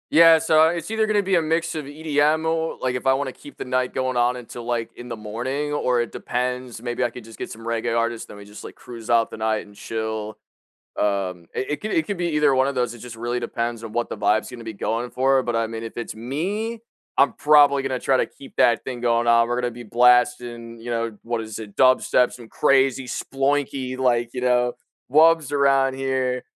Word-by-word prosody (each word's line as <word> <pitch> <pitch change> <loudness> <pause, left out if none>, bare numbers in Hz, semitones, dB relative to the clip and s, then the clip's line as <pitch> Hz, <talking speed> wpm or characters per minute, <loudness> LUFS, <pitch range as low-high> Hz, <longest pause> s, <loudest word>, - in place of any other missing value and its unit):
Yeah, 165 0 +8
so 160 0 +4
it's 170 +3 -3
either 220 -1 +1
gonna 210 -1 +2
be 190 0 +1
a 170 - +4
mix 165 +1 0
of 155 -3 -4
EDM 150 +1 +1
or 160 0 -1
like, 130 -1 -1
if 125 - -3
I 130 - +6
wanna 135 0 -2
keep 145 +2 -14
the - - -4
night 130 0 -1
going 130 -1 -1
on 120 +1 +2
until, 120 -1 -9
like, 120 -1 -2
in 120 - -9
the 120 - -5
morning 125 +7 -4
or 125 -4 +1
it 120 - -4
depends, 125 -1 -3
maybe 120 0 -3
I - - 0
could 120 0 -10
just 115 -1 -14
get - - -5
some 115 - -10
reggae 115 0 -1
artists, 115 0 -1
then - - -11
we 100 - -11
just, 105 +1 -12
like, - - -10
cruise 115 -2 -11
out 115 -1 +3
the - - -7
night 110 0 -1
and 105 - -17
chill. 110 0 -4 0.6
Um, 95 -4 -1
it - - -1
i - - 0
it - - -4
could 215 - -4
it 330 - +1
could 200 -2 -3
be 175 0 -1
either 150 -3 +3
one 130 +1 +3
of 140 - -3
those, 125 -2 0
it 120 - -12
just 120 0 -9
really 120 +2 -2
depends 115 -1 -3
on 115 - -7
what 120 +2 -1
the - - -6
vibe's 110 +3 +1
gonna 120 -2 -9
be 115 - -5
going 115 +4 -2
for 135 +1 +2
but, 120 -2 -2
I 115 0 +1
mean, 115 0 -6
if 115 - -8
it's 120 - -4
me, 185 - -3 0.4
I'm 140 - +4
probably 145 -2 +5
gonna 130 -1 -2
try 135 +2 +2
to - - +1
keep 135 - -15
that 120 - +4
thing 125 -2 -6
going 120 -1 +2
on, 115 0 +4
we're 120 +1 -1
gonna 125 -1 -1
be 120 +1 -10
blasting, 120 0 +2
you 120 +1 -6
know, 115 -2 -2
what 115 0 -2
is 110 -1 -7
it? 105 -2 -9
Dubstep, 130 -1 +4
some 120 -2 -11
crazy 135 -1 +2
sploinky, 135 0 -2
like, 120 -2 +1
you 125 - -3
know, 125 -1 +2 0.4
wubs 160 0 +5
around 135 -2 +3
here. 130 -1 -1
125 Hz, 235 wpm, -23 LUFS, 115-140 Hz, 0.6 s, Yeah